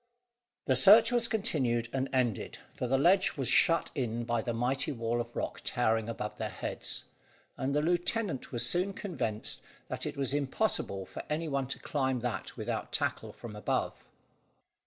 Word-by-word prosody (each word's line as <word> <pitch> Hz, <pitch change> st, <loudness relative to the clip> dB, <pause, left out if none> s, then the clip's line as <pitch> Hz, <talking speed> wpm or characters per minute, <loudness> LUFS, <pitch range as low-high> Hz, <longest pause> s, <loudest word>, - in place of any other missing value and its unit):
The 130 Hz, -, +3 dB
search 215 Hz, -, +8 dB
was 240 Hz, -1 st, +2 dB
continued 135 Hz, -, +1 dB
and 135 Hz, 0 st, -1 dB
ended, 125 Hz, -6 st, 0 dB, 0.2 s
for 125 Hz, -, -3 dB
the 135 Hz, +2 st, +3 dB
ledge 185 Hz, +6 st, +4 dB
was 135 Hz, -3 st, 0 dB
shut 165 Hz, 0 st, +4 dB
in 120 Hz, -5 st, -2 dB
by 120 Hz, -1 st, 0 dB
the 120 Hz, -, -2 dB
mighty 125 Hz, +6 st, 0 dB
wall 115 Hz, -2 st, -1 dB
of 120 Hz, 0 st, -8 dB
rock -, -, -3 dB
towering 115 Hz, -2 st, +1 dB
above 105 Hz, -2 st, -5 dB
their -, -, -2 dB
heads, -, -, -4 dB, 0.5 s
and 140 Hz, +2 st, -1 dB
the 150 Hz, -, +2 dB
lieutenant 175 Hz, -, 0 dB
was 120 Hz, -2 st, +1 dB
soon 180 Hz, +8 st, +1 dB
convinced 135 Hz, -, -3 dB, 0.3 s
that -, -, -3 dB
it -, -, -5 dB
was 135 Hz, -1 st, +1 dB
impossible 140 Hz, -, 0 dB
for -, -, -7 dB
any 160 Hz, +2 st, -1 dB
one 140 Hz, -3 st, -1 dB
to 135 Hz, -, -4 dB
climb 130 Hz, -4 st, -1 dB
that 125 Hz, -1 st, -4 dB
without -, -, -3 dB
tackle -, -, -1 dB
from 115 Hz, -3 st, -9 dB
above. 105 Hz, -, -2 dB
130 Hz, 170 wpm, -31 LUFS, 120-165 Hz, 0.5 s, search